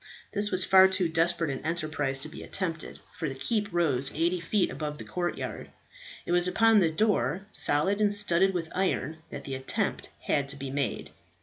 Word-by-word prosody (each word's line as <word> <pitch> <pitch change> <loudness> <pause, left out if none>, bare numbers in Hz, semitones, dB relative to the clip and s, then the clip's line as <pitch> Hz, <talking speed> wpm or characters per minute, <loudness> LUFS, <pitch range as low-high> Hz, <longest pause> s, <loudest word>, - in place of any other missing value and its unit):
This 205 0 +1
was 185 -1 +4
far 190 -1 +7
too 185 -2 +1
desperate 165 -1 +1
an 135 - -6
enterprise 155 -4 -1
to 155 - -5
be 155 - -10
attempted, 165 -4 -3 0.2
for 165 -4 -3
the 135 - -6
keep 210 - -1
rose 145 -7 +1
eighty 170 +3 +1
feet 185 +4 0
above 150 -1 -5
the - - -8
courtyard. 175 -1 -4 0.6
It - - -4
was 175 0 +3
upon 225 +3 +4
the 170 -4 +3
door, 190 - 0
solid 190 +9 +1
and 205 -1 +3
studded 195 -2 +4
with 165 -3 -4
iron, 170 -5 -1
that - - -7
the 135 - -6
attempt 130 0 -2
had 140 -1 0
to 140 - -4
be 135 -1 -6
made. 140 0 -3
170 Hz, 190 wpm, -28 LUFS, 150-190 Hz, 0.6 s, far